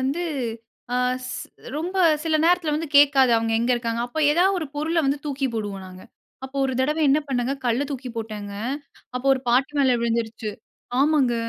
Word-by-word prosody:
வந்து, 280 +7 -1 0.7
ஆ - - +2 0.3
ஸ் - - -5 0.5
ரொம்ப 350 +5 -3 0.3
சில 315 -1 +2
நேரத்துல 335 -3 +3
வந்து 315 0 -4
கேட்காது, 275 -3 +6
அவங்க 225 0 0
எங்க 240 +2 +1
இருக்காங்கன்னு. 235 -1 -2
அப்ப 245 +6 -6
ஏதாவது 375 +4 +3
ஒரு 315 - -3
பொருள 315 +3 -1
வந்து 275 +1 +1
தூக்கி 275 -1 -1
போடுவோம் 200 -3 -4
நாங்க. 185 0 -12 0.4
அப்போ 265 +1 -8
ஒரு 265 - 0
தடவ 300 +4 +1
என்ன 280 +3 +5
பண்ணேங்க, 260 0 0
கல்ல 240 +4 +1
தூக்கி 260 -2 -5
போட்டேங்க. 210 -2 -5 0.6
அப்போ 250 +2 -3
ஒரு 260 - -4
பாட்டி 260 +3 +2
மேல 260 -3 +4
விழுந்துருச்சு 225 -2 -2 0.5
ஆமாங்க. 280 -5 +3
265 Hz, 170 wpm, -23 LUFS, 235-300 Hz, 0.7 s, கேட்காது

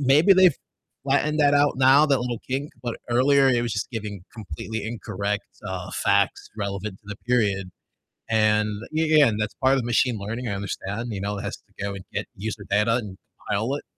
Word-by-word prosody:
Maybe 145 +8 +5
they've 185 -4 +6 0.5
flattened 145 +3 +1
that 145 0 +5
out 145 0 +3
now, 135 +3 +6
that 135 -4 +2
little 120 -1 -3
kink, 135 +3 -2
but 120 -2 -3
earlier 135 +3 +4
it 120 -2 +2
was 120 - -2
just 105 - -2
giving 105 -5 -6
completely 110 +1 -6
incorrect, 105 -2 -3 0.2
uh, 90 -1 -5
facts 100 0 +1
relevant 100 -1 -4
to - - -40
the 105 0 -7
period. 100 -6 +1 0.6
And 110 -1 +3 0.2
y 160 +1 +1
yeah, 155 -2 +6
and 110 -2 -1
that's 105 0 -2
part 130 0 +3
of 135 - +3
the 120 - -3
machine 120 0 +2
learning, 115 +5 -4
I 100 - -2
understand, 100 +3 -4
you 100 -3 -4
know, 100 +1 -2
it - - -5
has - - -4
to - - -12
go 100 0 -2
and 95 -2 -8
get - - -2
user 105 0 -5
data 105 +3 +3
and 105 -6 -4 0.3
compile 110 +7 0
it - - -6
115 Hz, 205 wpm, -24 LUFS, 100-135 Hz, 0.6 s, they've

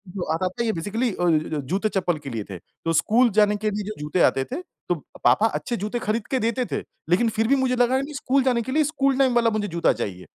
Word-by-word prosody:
जो 180 - -2
आता 185 +3 0
था 235 +6 -3
ये 220 - +1
बेसिकली 215 +9 -1
अ, 160 -4 0
जूते 190 +10 -1
चप्पल 180 -5 0
के 140 -2 -8
लिए 115 -4 -4
थे। 95 - -6
तो 165 - -5
स्कूल 230 +9 +4
जाने 210 0 +4
के 215 +1 -1
लिए 205 0 -3
जो 215 - -3
जूते 150 +4 -1
आते 135 - -2
थे 320 +7 -3 0.3
तो 175 - +3 0.3
पापा 130 - +5
अच्छे 235 +2 -3
जूते 210 +5 -3
ख़रीद 215 0 -2
के 260 - +2
देते 245 +2 0
थे - - -1 0.3
लेकिन 225 +6 +3
फिर 225 +1 +1
भी 275 - +4
मुझे 260 -1 +1
लगा 245 +1 +3
नहीं 295 +2 -6
स्कूल 270 -1 +1
जाने 245 -3 +2
के 260 - -5
लिए 305 +2 +3
स्कूल 275 -2 +1
टाइम 260 -3 +3
वाला 230 -1 +4
मुझे 215 -1 -1
जूता 170 -1 +1
चाहिए। 90 -2 -5
215 Hz, 255 wpm, -24 LUFS, 175-250 Hz, 0.3 s, पापा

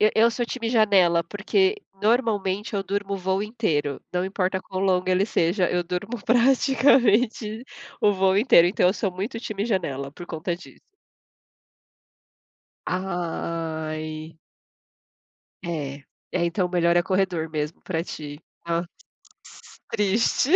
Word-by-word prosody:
E 215 +1 +5
eu 230 +1 +5
sou 240 +1 -2
time 230 -1 -3
janela, 195 -7 +4
porque, 380 - +1 0.3
normalmente 210 -3 +1
eu 200 - 0
durmo 200 +1 -2
o - - -2
voo 190 +1 -1
inteiro. 170 - -1
Não 180 0 0
importa 190 -1 -1
quão 190 0 -5
longo 185 -1 +1
ele 185 +1 +3
seja, 180 -2 +1
eu 175 0 0
durmo 185 +6 -4
praticamente 240 -3 +3 0.4
o 205 - +4
voo 190 0 +2
inteiro, 200 -6 +6
então 180 0 +2
eu - - +3
sou 200 -3 -2
muito 200 +6 -4
time 210 -3 -3
janela 145 - -2
por 175 +2 -10
conta 170 +1 -3
disso. - - -15 2.1
Ai! 160 -3 -4 1.2
É. 150 -5 -4 0.4
É, 180 -2 +1
então 180 +2 0
melhor 175 -1 +2
é 175 - +4
corredor 185 -4 0
mesmo 155 0 -4
pra 165 -4 -2
ti. 150 -3 -8 0.3
Hã. 170 0 0 1.1
Triste. 215 +6 +2
190 Hz, 130 wpm, -24 LUFS, 170-215 Hz, 2.1 s, inteiro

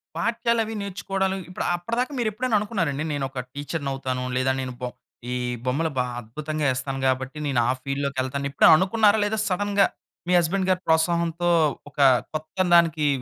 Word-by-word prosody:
పాఠ్యాలు 235 0 +1
అవి 220 +1 -5
నేర్చుకోడలు 195 0 -2
ఇప్పుడు 180 - -4
అప్పటిదాకా 230 +10 -2
మీరు 230 -3 +1
ఎప్పుడైనా 235 +1 -1
అనుకున్నారండి, 170 -9 -2
"నేను 140 -2 -1
ఒక 135 - -6
టీచర్‌నౌతాను 135 -3 -3
లేదా 130 +1 +2
నేను 130 -1 -5
బో 125 - -2 0.4
ఈ - - -1 0.3
బొమ్మలు 145 +6 0
బా 125 - +3 0.2
అద్భుతంగా 150 +7 -4
ఎస్తాను 135 +1 -4
కాబట్టి 130 +3 -1
నేను 130 -3 +1
ఆ - - +3
ఫీల్డ్‌లోకి 140 -1 -2
ఎళ్తాను" 140 +2 -3
ఎప్పుడైనా 140 - +7
అనుకున్నారా? 210 +2 +3
లేదా 220 +1 -1
సడెన్‌గా 200 +1 +2 0.4
మీ 180 - +2
హస్బేండ్ 185 +3 0
గారి 185 0 0
ప్రోత్సాహంతో, 170 +1 +2 0.4
ఒక 145 - -13 0.3
కొత్త 155 +2 -6 0.2
దాన్కి 165 -3 +4
165 Hz, 160 wpm, -24 LUFS, 140-200 Hz, 0.4 s, ఎప్పుడైనా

